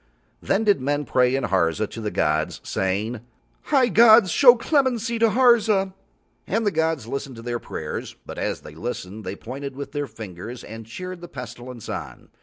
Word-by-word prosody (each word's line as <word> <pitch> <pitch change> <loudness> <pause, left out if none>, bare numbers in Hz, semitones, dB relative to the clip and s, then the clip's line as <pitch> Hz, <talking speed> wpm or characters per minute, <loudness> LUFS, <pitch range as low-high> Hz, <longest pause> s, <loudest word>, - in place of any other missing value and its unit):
Then 200 +3 +1
did 205 -9 +3
men 145 +2 0
pray 125 0 +2
in 135 - -1
Harza 95 0 +1
to 115 - -8
the 105 - -2
gods, 75 -4 0
saying: 105 +5 -2 0.4
"High 265 -4 +3
gods! 220 -2 +7
Show 245 - +8
clemency 245 -3 +1
to 230 0 +5
Harza." 215 -5 +4 0.5
And 225 +3 0
the 205 - +2
gods 160 - 0
listened 135 +2 -5
to 115 - -10
their 120 0 -2
prayers, - - -6
but - - -7
as - - -2
They 75 - -11
listened 105 +2 -6
They 95 - -4
pointed 135 +5 -7
with 140 +1 -6
their 145 -1 -3
fingers 110 +1 -8
and 110 0 -9
cheered 180 +8 -7
the 175 - -8
Pestilence 125 -4 -9
on. - - -7
135 Hz, 180 wpm, -23 LUFS, -, 0.5 s, Show